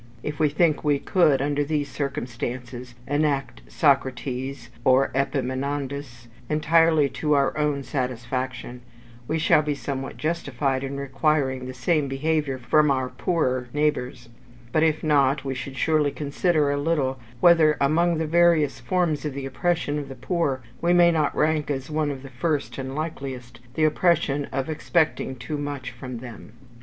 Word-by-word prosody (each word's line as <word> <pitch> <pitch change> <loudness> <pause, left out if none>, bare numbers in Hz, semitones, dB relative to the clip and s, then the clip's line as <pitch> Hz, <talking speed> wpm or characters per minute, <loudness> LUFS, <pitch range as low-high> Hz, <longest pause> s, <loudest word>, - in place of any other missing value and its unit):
If 150 -1 -4
we 155 -1 +3
think 155 +1 +2
we 145 -2 +3
could, 140 -3 +2
under 145 0 0
these 145 -1 -1
circumstances, 125 -2 -5
enact 145 -1 -1
Socrates 130 -3 0
or 130 +2 +4
Epaminondas 135 -1 -3 0.2
entirely 155 0 +4
to 150 +2 0
our 140 -1 +2
own 150 -2 0
satisfaction, 125 -1 -4 0.5
we 160 - 0
shall 155 -1 +4
be 150 -1 -2
somewhat 135 -1 -5
justified 140 -4 -1
in 135 +1 -4
requiring 135 -1 0
the 130 - -6
same 150 +3 +1
behaviour 145 0 -1
from 150 +4 +3
our 130 -2 0
poorer 130 -8 -1
neighbours; 145 -5 -1 0.4
but 155 - +2
if 155 -1 +2
not, 140 -2 +2
we 135 - -1
should 135 +1 -7
surely 155 -1 +2
consider 150 +1 0
a 145 0 -1
little 140 -4 0 0.2
whether 160 -1 +5
among 165 +4 +2
the 160 - -1
various 165 -2 +3
forms 175 -5 0
of 150 -3 -3
the 140 -1 -4
oppression 150 +1 -1
of 140 -1 -7
the 135 - -7
poor, 135 -1 -1 0.2
we 175 +1 +3
may 175 -1 +6
not 155 -3 0
rank 155 -1 +1
as 135 0 -3
one 150 -1 0
of 135 -2 -6
the 135 - -10
first 140 +2 -2
and 135 0 -5
likeliest 135 -6 -5 0.2
the 160 - +1
oppression 155 -3 +2
of 135 0 -2
expecting 155 -3 0
too 145 +4 -5
much 145 -3 -4
from 125 0 -7
them. 115 -2 -10
140 Hz, 155 wpm, -24 LUFS, 130-155 Hz, 0.5 s, may